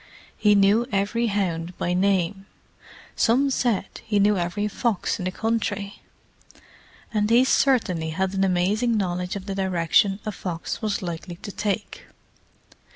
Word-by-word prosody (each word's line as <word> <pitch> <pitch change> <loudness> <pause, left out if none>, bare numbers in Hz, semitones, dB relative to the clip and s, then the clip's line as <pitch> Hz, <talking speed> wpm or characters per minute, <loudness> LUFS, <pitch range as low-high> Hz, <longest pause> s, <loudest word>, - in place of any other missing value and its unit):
He 210 -1 +4
knew 205 +4 +4
every 210 +4 0
hound 180 -4 -2
by 175 - -1
name; 195 0 0 0.7
some 265 +5 +3
said 230 -7 -1
he 220 -2 -1
knew 205 +1 +4
every 180 +3 -1
fox 210 -2 -1
in 180 - -4
the 185 - -1
country; 205 -1 -2 1.1
and 210 -1 +1
he 235 +2 +6
certainly 210 -13 +2
had 190 +4 -1
an 195 0 +1
amazing 200 +6 +1
knowledge 180 -2 -2
of 195 -1 -6
the 200 - -4
direction 190 +1 +2
a 215 - -2
fox 175 -3 -5
was 210 -3 -2
likely 175 0 -5
to 205 +3 -8
take. 205 0 -3
200 Hz, 145 wpm, -24 LUFS, 180-215 Hz, 1.1 s, he